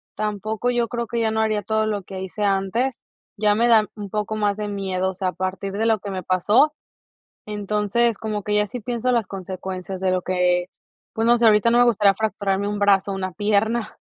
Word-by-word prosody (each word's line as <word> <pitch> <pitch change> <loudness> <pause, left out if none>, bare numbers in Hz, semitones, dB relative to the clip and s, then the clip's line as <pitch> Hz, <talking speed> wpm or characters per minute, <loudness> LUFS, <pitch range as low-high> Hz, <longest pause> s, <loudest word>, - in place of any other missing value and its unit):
tampoco 215 +2 -2
yo 240 -1 +1
creo 235 -1 -3
que 235 - -2
ya 220 - +1
no 220 0 0
haría 215 -1 0
todo 220 +2 0
lo 205 -2 -2
que 190 0 -7
hice 190 +3 -5
antes, 200 +6 0 0.4
ya 210 0 +3
me 235 +3 +3
da 220 -3 +5
un 205 -2 -7
poco 210 0 -2
más 205 -1 0
de 210 -1 -3
miedo, 190 -2 -1
o - - -10
sea, 185 0 -1
a - - -6
partir 185 +1 -3
de 220 +3 -1
lo 220 -1 +3
que 200 0 -6
me 185 -1 -3
pasó, 205 - +3 0.8
entonces, 210 +2 0
como 215 -2 -3
que 210 - -1
ya 210 0 +2
sí 250 - -6
pienso 240 +2 -2
las 230 -4 +1
consecuencias 190 0 -6
de 190 -1 +1
lo 185 -1 0
que 180 -1 +1 0.5
pues, 225 +1 0
no 240 +1 +5
sé, 230 - +4
ahorita 215 +2 +5
no 240 - +4
me 245 - +6
gustaría 205 -4 +4
fracturarme 200 -1 -1
un 205 0 -3
brazo 200 -1 +3
o - - -3
una 185 -1 -3
pierna. 215 +4 0
210 Hz, 225 wpm, -22 LUFS, 195-220 Hz, 0.8 s, me